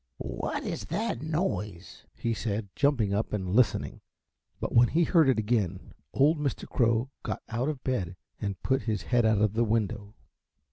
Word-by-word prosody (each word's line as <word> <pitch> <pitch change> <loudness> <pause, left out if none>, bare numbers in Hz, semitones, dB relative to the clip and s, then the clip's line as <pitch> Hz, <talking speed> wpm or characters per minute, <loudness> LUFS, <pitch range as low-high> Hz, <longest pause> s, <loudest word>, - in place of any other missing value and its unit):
"What - - -3
is 100 - -4
that 220 - -2
noise?" 150 - -3
he 115 - -1
said, 105 -2 -3
jumping 125 -9 +2
up 105 +2 -1
and 95 -3 -2
listening; 125 0 +2 0.6
but - - -3
when 120 +1 +7
he 170 +7 +2
heard 160 -4 +4
it 130 - +3
again 105 -5 -1 0.2
old 150 +3 +3
Mr. 145 -2 -2
Crow 115 +2 +1
got - - -4
out 120 +5 -1
of 145 -4 -5
bed 95 -9 -1 0.3
and 100 -3 -3
put 130 0 +2
his 105 -3 -1
head 120 -2 +2
out 110 -2 +3
of 105 -1 +2
the 115 +2 +2
window. 105 -2 -1
115 Hz, 175 wpm, -28 LUFS, 105-135 Hz, 0.6 s, when